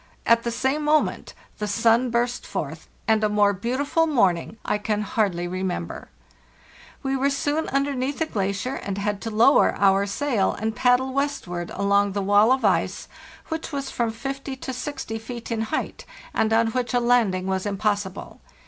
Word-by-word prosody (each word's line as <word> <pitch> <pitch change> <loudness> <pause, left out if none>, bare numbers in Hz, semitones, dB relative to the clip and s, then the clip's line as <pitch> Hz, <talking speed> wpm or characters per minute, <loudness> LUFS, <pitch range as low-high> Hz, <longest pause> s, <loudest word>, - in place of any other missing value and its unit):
At 230 0 +5
the 235 - -2
same 265 +5 0
moment 300 +1 +1 0.2
the 210 - -2
sun 230 +4 +3
burst 240 +1 0
forth, 155 +2 -5 0.2
and 220 -1 +3
a 215 - +3
more 205 -1 +3
beautiful 265 - 0
morning 200 - +1
I 210 - 0
can 210 0 -1
hardly 195 -6 0
remember. 180 - -4 0.9
We 270 0 0
were 270 +1 +2
soon 290 +3 -1
underneath 275 0 -1
the 320 - 0
glacier, 200 0 -2
and 200 -6 -4
had 205 0 -2
to 225 - -4
lower 225 +6 +4
our 195 0 +3
sail 230 -2 0
and 220 +1 -3
paddle 255 +1 +2
westward 260 -12 -2
along 200 0 +2
the 200 0 -1
wall 205 +4 +5
of 260 0 +2
ice, - - +1 0.4
which 320 0 -4
was 275 -2 -4
from 235 -1 0
50 270 +4 -5
to 260 0 -6
60 250 -4 -5
feet 235 +1 -8
in 225 -1 -1
height, 220 - -3 0.3
and 220 - +1
on 225 0 +3
which 250 +1 -2
a - - +4
landing 235 -7 +2
was 190 +1 -1
impossible. 205 -1 -2
225 Hz, 170 wpm, -24 LUFS, 200-260 Hz, 0.9 s, At